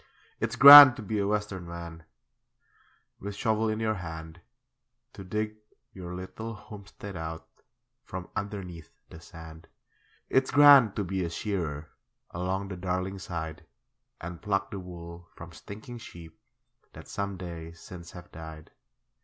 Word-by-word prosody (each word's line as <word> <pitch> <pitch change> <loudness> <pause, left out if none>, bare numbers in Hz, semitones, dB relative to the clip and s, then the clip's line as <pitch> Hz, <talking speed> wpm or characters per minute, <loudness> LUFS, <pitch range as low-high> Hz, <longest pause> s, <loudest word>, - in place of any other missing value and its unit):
It's 115 +1 -2
grand 140 0 +12
to 110 - -8
be 105 +1 -2
a 100 - 0
Western 105 -4 -3
man, 85 -1 -8 1.2
With 100 +1 -7
shovel 110 +1 0
in 110 0 -2
your 110 -1 0
hand, 80 -3 -8 0.7
To 95 - -10
dig 105 +3 -4 0.4
your 90 -2 -8
little 110 +5 -7
homestead 100 -1 -11
out 80 0 -7 0.6
From 90 -5 -8
underneath 95 -5 -6 0.2
the 80 - -11
sand. 80 -1 -13 0.6
It's 130 0 +1
grand 140 -7 +7
to 105 - -1
be 95 0 -3
a 85 - -3
shearer, 85 -5 -4 0.4
Along 95 +3 -3
the 95 - -6
Darling 95 +2 -3
side, 85 -3 -6 0.6
And 85 0 -8
pluck 100 -1 -1
the 100 - -5
wool 85 -1 -10
from 85 0 -11
stinking 110 +8 -10
sheep 85 -7 -12 0.6
That - - -12
some 100 -1 -4
days 85 -2 -9
since 85 -2 -11
have 90 -1 -12
died. 80 -1 -11
95 Hz, 140 wpm, -28 LUFS, 85-105 Hz, 1.2 s, grand